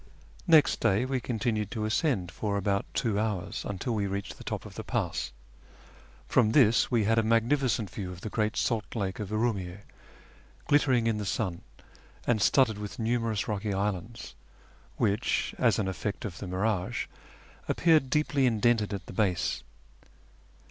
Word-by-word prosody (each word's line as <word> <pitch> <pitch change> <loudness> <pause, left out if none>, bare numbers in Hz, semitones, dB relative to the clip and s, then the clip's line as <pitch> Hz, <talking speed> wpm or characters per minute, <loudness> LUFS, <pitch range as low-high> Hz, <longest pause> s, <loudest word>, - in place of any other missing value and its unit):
Next 160 -4 +5
day 110 +1 +2
we 130 0 -1
continued 110 -3 -1
to 110 -1 -3
ascend 110 - 0
for 100 +2 -2
about 100 0 0
two 110 -5 +1
hours, 105 -5 -2
until 100 +5 -2
we 105 -2 0
reached 100 0 -5
the - - -9
top - - -4
of - - -10
the - - -6
pass. - - -2 1.0
From 115 -4 +3
this 120 -5 +5
we 120 -3 +2
had 115 +2 +3
a - - +4
magnificent 115 +1 +2
view 95 -4 -5
of 90 -1 -10
the 110 - -5
great 110 -1 0
salt 115 -2 -1
lake 95 -4 -2
of 105 -3 -4
Urumiyy^, 105 -4 -1 0.8
glittering 130 -5 +3
in 110 -2 +1
the - - -3
sun, 90 -4 -2 0.6
and 110 -3 +2
studded 110 +1 +3
with 105 -1 -6
numerous 115 -2 0
rocky 105 -1 -2
islands, 105 - -3 0.6
which, 105 +4 0
as 115 -6 +3
an 100 - 0
effect 100 +3 -3
of 95 -4 -6
the 100 - -6
mirage, 95 +1 -1 0.6
aj^peared 160 -5 +3
deeply 145 -1 +2
indented 110 -2 +2
at 100 - -7
the - - -9
base. 90 -3 0
110 Hz, 160 wpm, -29 LUFS, 100-120 Hz, 1.0 s, Next